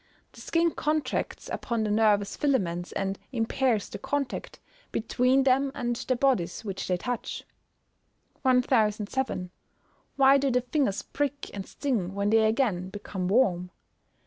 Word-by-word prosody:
The - - -13
skin 335 0 +2
contracts 305 0 -2
upon 235 -3 -2
the 210 - -1
nervous 210 -2 +3
filaments, 185 -12 0
and 195 0 -2
impairs 230 -2 0
the - - -8
contact 285 -3 -3 0.3
between 250 +4 +2
them 270 +1 +3
and 240 -3 -1
the 255 +2 -1
bodies 240 -7 +1
which 195 -2 -4
they 180 - +1
touch. 245 +5 -4 1.0
1007. 230 -5 +1 0.7
_Why 275 0 +6
do 275 0 +1
the 250 0 +2
fingers 250 -5 0
prick 285 0 -3
and 195 -2 -6
sting 210 -10 -2
when 200 +1 0
they 220 0 +5
again 215 -6 0
become 190 -2 -5
warm? 185 -5 +2
235 Hz, 135 wpm, -27 LUFS, 200-265 Hz, 1.0 s, Why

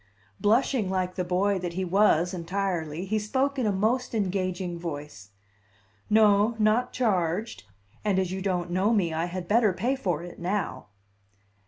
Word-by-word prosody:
Blushing 225 -1 +2
like 185 -1 -1
the 180 - -2
boy 190 +2 +1
that 175 -1 -4
he 185 +2 -2
was 180 -2 +3
entirely, 175 -2 -2
he 215 +3 0
spoke 265 +6 -1
in 240 - +1
a - - +2
most 230 +6 0
engaging 185 -3 -2
voice: 145 - -7 0.8
"No, 210 +1 +4
not 220 +3 +2
charged; 185 - -1 0.4
and 205 -3 +1
as 185 -1 0
you 190 0 -4
don't 180 -2 -1
know 190 +5 +2
me, 175 -6 +1
I 165 +1 0
had 175 0 -5
better 215 -1 +3
pay 235 +10 0
for 175 - -2
it 175 - -10
now." 190 +3 -3
190 Hz, 160 wpm, -27 LUFS, 175-215 Hz, 0.8 s, No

